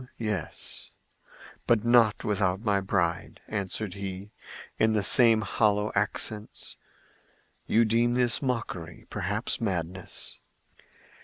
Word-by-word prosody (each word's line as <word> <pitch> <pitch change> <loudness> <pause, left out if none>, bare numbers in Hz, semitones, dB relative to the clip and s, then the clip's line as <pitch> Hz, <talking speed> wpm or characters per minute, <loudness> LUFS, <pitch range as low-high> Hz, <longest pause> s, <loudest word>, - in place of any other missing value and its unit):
"Home—yes; 110 -5 -4 0.8
but 115 -2 +3
not 120 -3 +4
without 95 -2 0
my 105 -3 +1
bride," 85 -4 -1
answered 100 -1 -4
he, 100 +1 -6 0.5
in 110 0 +3
the 105 -2 +1
same 115 0 +6
hollow 105 0 +1
accents. 105 +1 -2 0.9
"You 115 +1 +4
deem 120 +2 +2
this 125 -1 +2
mockery—perhaps 105 - -3
madness. 90 -3 -3
105 Hz, 95 wpm, -27 LUFS, 95-115 Hz, 0.9 s, same